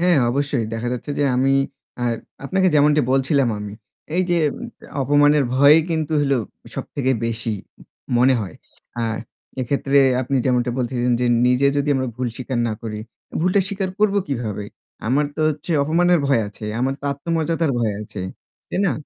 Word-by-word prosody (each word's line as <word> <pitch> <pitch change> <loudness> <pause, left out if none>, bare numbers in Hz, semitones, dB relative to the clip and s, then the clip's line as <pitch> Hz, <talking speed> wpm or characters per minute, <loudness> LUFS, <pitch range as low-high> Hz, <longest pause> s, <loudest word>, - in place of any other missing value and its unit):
হ্যাঁ, 175 -3 +4
অবশ্যই 140 -2 0
দেখা 115 +2 -2
যাচ্ছে 125 +4 -5
যে - - +2
আমি 135 +2 +3 0.5
আর 120 -1 +1 0.3
আপনাকে 190 +5 +2
যেমনটি 150 +1 +5
বলছিলাম 135 0 +2
আমি। 105 -1 -6 0.4
এই 185 - +3
যে 175 - +3 0.2
উম - - -6 0.4
অপমানের 145 +1 +4
ভয়ই 145 +4 +7
কিন্তু 160 -2 -1
হলো 140 -1 +2 0.4
সবথেকে 130 -2 -1
বেশি 115 0 -3 0.7
মনে 130 +2 +5
হয়। 100 -4 -6 0.5
আ - - 0 0.6
এক্ষেত্রে 140 +2 +1 0.2
আপনি 130 +2 -1
যেমনটা 125 -1 +2
বলতেছেন 125 0 0
যে 125 - +2 0.2
নিজে 125 +2 +3
যদি 145 0 0
আমরা 130 -1 0
ভুল 125 -1 -1
স্বীকার 130 -1 -3
না - - -1
করি, 110 -2 -5 0.3
অ্যা - - -7
ভুলটা 185 +4 +3
স্বীকার 195 -2 -2
করবো 205 -1 +3
কিভাবে? 110 -6 -3 0.4
আমার 135 +6 +2
তো - - -2
হচ্ছে 155 +3 -4
অপমানের 175 +4 +3
ভয় 140 -4 +3
আছে। 105 +1 -11 0.2
আমার 135 +2 +1
তো - - -11
আত্মমর্যাদার 165 +2 -1
ভয় 115 -3 +1
আছে, 105 -1 -8 0.5
তাই - - -3
না? 175 - +2
135 Hz, 165 wpm, -21 LUFS, 125-155 Hz, 0.7 s, ভয়ই